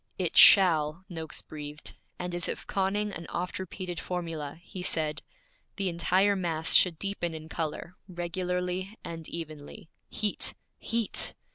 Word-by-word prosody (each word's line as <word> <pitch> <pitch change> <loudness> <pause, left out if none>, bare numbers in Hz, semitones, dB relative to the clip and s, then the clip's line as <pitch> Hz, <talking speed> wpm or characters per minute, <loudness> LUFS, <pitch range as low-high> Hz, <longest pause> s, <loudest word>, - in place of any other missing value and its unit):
'It - - -1
shall!' 165 -2 +7
Noakes 160 -3 -3
breathed; 150 0 -7 0.2
and 180 0 -4
as 175 -1 0
if - - -3
conning 205 +2 0
an 165 -1 -6
oft 180 +2 -3
repeated 185 -1 -5
formula, 165 -5 -4
he 180 +1 -9
said, 155 -3 -1 0.5
'The 195 -2 0
entire 185 +4 +3
mass 165 -4 0
should 175 -3 +7
deepen 175 -3 -2
in 155 0 -8
color, 160 +2 -4
regularly 180 +3 -2
and 165 -1 -6
evenly. 155 -2 -8 0.2
Heat! 210 -1 -1 0.2
Heat!' 230 -2 0
175 Hz, 135 wpm, -29 LUFS, 160-185 Hz, 0.5 s, shall